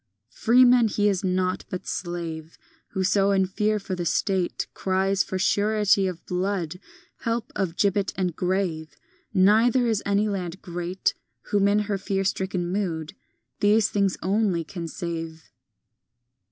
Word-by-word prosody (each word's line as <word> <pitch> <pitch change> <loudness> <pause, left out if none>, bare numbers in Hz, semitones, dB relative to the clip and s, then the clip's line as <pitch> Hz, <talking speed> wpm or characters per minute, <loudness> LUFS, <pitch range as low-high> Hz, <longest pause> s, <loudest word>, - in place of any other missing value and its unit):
X - - -22
Freeman 245 0 +6
he 205 -1 +1
is 195 -2 0
not, 185 0 0
but 180 - -5
slave, 165 -2 -5 0.4
Whoso 195 +1 +2
in 195 -1 +3
fear 210 +3 0
for 195 -2 -5
the 180 -1 -2
State 185 +2 0
Cries 190 +1 +1
for 190 - -4
surety 205 0 +2
of 180 -2 -6
blood, 180 -2 -2 0.4
Help 230 -1 -3
of 175 -3 -2
gibbet 200 -1 +1
and 180 -4 -1
grave; 180 -4 -2 0.4
Neither 220 +6 +4
is 220 -3 +1
any 200 +1 +1
land 190 -3 -4
great 175 +1 -2 0.4
Whom, 200 -1 +3
in 205 +1 +3
her 205 -1 -2
fear 195 0 -1
stricken 185 -2 -1
mood, 170 -6 -2 0.5
These 210 +1 +4
things 200 -2 +1
only 195 -3 +1
can 170 +1 -6
save. 165 -1 -6
190 Hz, 140 wpm, -25 LUFS, 180-205 Hz, 0.5 s, Freeman